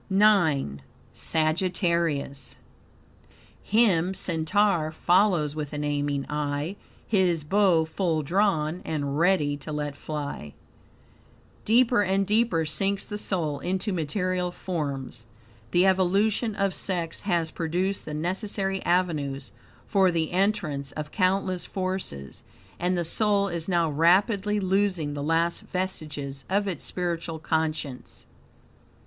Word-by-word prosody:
IX. 175 - +3 0.3
Sagittarius 165 -4 0 1.1
"Him 190 -5 +2
Centaur 170 0 +1
follows 175 -3 +2
with 150 -2 -4
an 150 0 -3
aiming 145 -1 -1
eye, 150 +4 -2 0.3
His 180 -6 +2
bow 180 -1 +3
full 160 -1 -1
drawn, 175 -1 +1
and 145 -2 -2
ready 165 -5 +3
to 155 - -8
let 150 -1 -3
fly." 145 - -6 1.1
Deeper 240 0 +4
and 195 0 +1
deeper 210 -5 +2
sinks 195 +5 0
the 210 -1 -5
soul 160 -8 -1
into 190 +3 -1
material 180 +2 -1
forms. 140 -10 -4 0.4
The 175 +9 +3
evolution 200 +4 +2
of 195 -2 0
sex 170 -3 -2
has 170 -5 0
produced 180 +4 -1
the 150 - -5
necessary 195 +3 -2
avenues 150 -7 0 0.3
for 190 -2 +3
the 165 -2 -1
entrance 175 -8 0
of 150 -1 -6
countless 185 -1 +1
forces, 185 - -4 0.4
and 180 +1 0
the 175 - 0
soul 200 +2 +2
is 170 0 -3
now 170 -2 +2
rapidly 195 +6 +3
losing 190 -5 0
the 145 - -4
last 165 +3 +1
vestiges 150 -7 -4
of 200 +2 +1
its 175 -7 -4
spiritual 170 -2 -3
conscience. 160 -4 -3
175 Hz, 115 wpm, -26 LUFS, 150-195 Hz, 1.1 s, Deeper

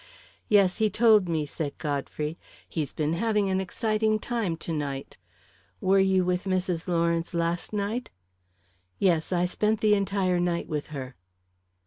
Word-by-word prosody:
"Yes, 200 -3 +4
he 215 -1 +2
told 215 -5 +4
me," 160 -2 0
said 145 0 -5
Godfrey. 150 +1 -3 0.3
"He's 150 -5 -3
been 155 +1 -1
having 210 +1 +1
an 190 0 +1
exciting 215 +3 0
time 215 -7 -2
to 165 - -4
night. 140 -3 -4 0.6
Were 195 +1 +3
you 190 -1 +3
with 180 +1 0
Mrs. 185 -3 -1
Lawrence 170 0 0
last 170 +1 -1
night?" 215 +4 -2 0.9
"Yes; 170 -4 +2
I 180 -1 +2
spent 210 +4 0
the 215 -1 +4
entire 195 -3 +1
night 175 -1 -1
with 150 -3 -3
her." 135 -4 -7
180 Hz, 145 wpm, -27 LUFS, 165-205 Hz, 0.9 s, Yes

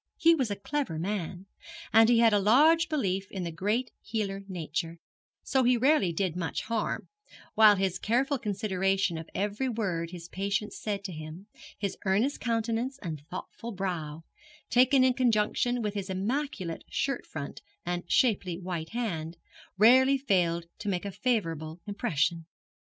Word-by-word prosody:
He 335 -1 +6
was 265 -8 0
a 205 - -1
clever 260 - -3
man, 185 0 -3 0.5
and 225 +1 +7
he 240 - +5
had 230 -1 +5
a 205 - +4
large 310 - +5
belief 195 - -1
in 190 -2 -4
the 170 - -3
great 210 +8 -1
healer 205 -3 -3
Nature, 165 -2 -4 0.5
so 265 -1 +2
he 245 0 +4
rarely 260 - +3
did 175 0 -1
much 170 -2 -3
harm; 230 -1 -2 0.5
while 215 -1 +7
his 190 -1 -1
careful 260 +5 +1
consideration 195 -3 0
of 160 - -9
every 210 +6 -1
word 185 -8 -2
his 170 -1 -9
patients 200 +3 -2
said 205 -2 -3
to 195 - -5
him, 155 +3 -8 0.3
his 200 -2 -3
earnest 210 +9 +1
countenance 230 +3 -1
and 155 -5 -5
thoughtful 225 +5 -7
brow, 165 -5 -4 0.5
taken 255 +2 +5
in 255 -1 +4
conjunction 245 0 +1
with 210 -1 -1
his 200 -2 -4
immaculate 195 - -2
shirt 275 -2 -1
front 140 -3 -7 0.2
and 175 0 -3
shapely 195 -8 +2
white 175 -3 -5
hand, 170 -9 -3 0.4
rarely 260 +6 +6
failed 175 -9 +1
to 210 - -3
make 180 0 -2
a 200 - -3
favourable 165 -9 -2
impression. 170 -6 -1
200 Hz, 155 wpm, -29 LUFS, 175-240 Hz, 0.5 s, and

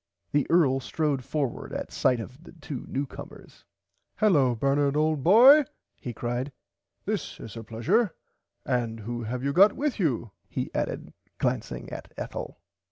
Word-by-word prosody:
The 145 -2 +2
earl 145 -6 +4
strode 145 -1 -1
forward 140 -2 -3
at - - -4
sight 125 -2 +2
of 125 +4 -8 0.2
two 145 -4 -6
new 140 +2 -2
comers. - - -12 0.5
Hullo 145 - +4
Bernard 140 +3 +1
old 155 -1 +2
boy 255 - +8 0.3
he 125 - -6
cried 120 +4 -3 0.5
this - - -3
is 110 - -9
a 115 - -6
pleasure 160 - +1 0.5
and 115 -3 -1
who 120 +3 -4
have 125 +3 -4
you 140 0 0
got 200 +6 +7
with 290 -4 -2
you 125 - 0 0.2
he - - -4
added - - -3 0.2
glancing - - -2
at - - -8
Ethel. - - -6
135 Hz, 150 wpm, -27 LUFS, 120-160 Hz, 0.5 s, boy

